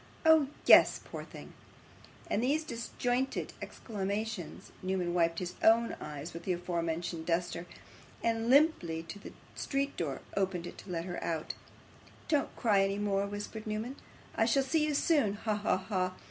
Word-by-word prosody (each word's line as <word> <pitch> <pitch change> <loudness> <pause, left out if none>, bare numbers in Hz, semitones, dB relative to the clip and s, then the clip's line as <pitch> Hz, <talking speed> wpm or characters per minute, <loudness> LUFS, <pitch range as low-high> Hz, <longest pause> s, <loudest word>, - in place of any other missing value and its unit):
Oh, 320 -3 +7 0.2
yes. - - +8
Poor - - -6
thing!' - - -11 0.7
With 210 - 0
these 290 +6 +2
disjointed 245 0 -2
exclamations, 205 -2 -4
Newman 185 -2 -1
wiped 165 -1 +2
his 180 0 -3
own 230 +1 +5
eyes 150 +3 -6
with 170 - -6
the 180 +1 0
afore 175 -1 -2
mentioned 165 0 -3
duster, 175 0 -1 0.6
and, 230 0 +1
limping 245 - +3
to 165 +5 -8
the - - -9 0.2
street 275 0 -1
door, 145 -5 -2
opened 190 -3 0
it - - -8
to - - -12
let 170 -1 -2
her 175 -1 -5
out. 160 -2 -2 0.8
'Don't 295 -4 +1
cry 210 -5 +3
any 195 +1 0
more,' 200 -1 0
whispered 205 +2 -6
Newman. 220 +5 -3 0.4
'I 225 - +3
shall 270 +4 +3
see 305 +3 +2
you 300 - 0
soon. 280 -10 +3
Ha! 215 +1 -1
ha! 205 -2 +1
ha! 185 -1 -1
200 Hz, 160 wpm, -32 LUFS, 175-235 Hz, 0.8 s, yes